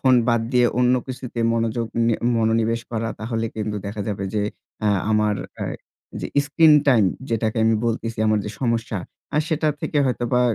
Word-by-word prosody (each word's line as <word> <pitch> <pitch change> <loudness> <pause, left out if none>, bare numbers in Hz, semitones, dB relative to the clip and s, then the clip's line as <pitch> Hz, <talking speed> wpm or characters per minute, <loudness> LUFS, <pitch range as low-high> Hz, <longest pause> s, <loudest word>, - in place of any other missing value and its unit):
Phone 130 -1 +5
বাদ 115 -1 +3
দিয়ে 125 -1 +5
অন্য 125 0 +4
কিছুতে 125 -2 -6
মনোযোগ 115 0 0 0.2
নি 115 - +3 0.3
মনোনিবেশ 115 +1 +1
করা। 115 -1 -2
তাহলে 115 0 -2
কিন্তু 105 -1 -2
দেখা 105 +1 -5
যাবে 100 -2 -3
যে, 105 - +1 0.4
অ্যা 105 - +2 0.2
আমার, 105 -1 +2 0.2
অ্যা - - -4 0.5
যে - - -3 0.2
স্ক্রিন 155 +2 +5 0.2
টাইম 115 -6 +5 0.2
যেটাকে 110 0 0
আমি 110 0 +4
বলতেছি 115 -1 -2
আমার 110 0 +3
যে - - -3
সমস্যা, 115 -3 -1 0.4
আর 150 - +4
সেটা 155 -1 +1
থেকে 150 - -1
হয়তোবা 125 0 0
115 Hz, 170 wpm, -22 LUFS, 110-125 Hz, 0.5 s, Phone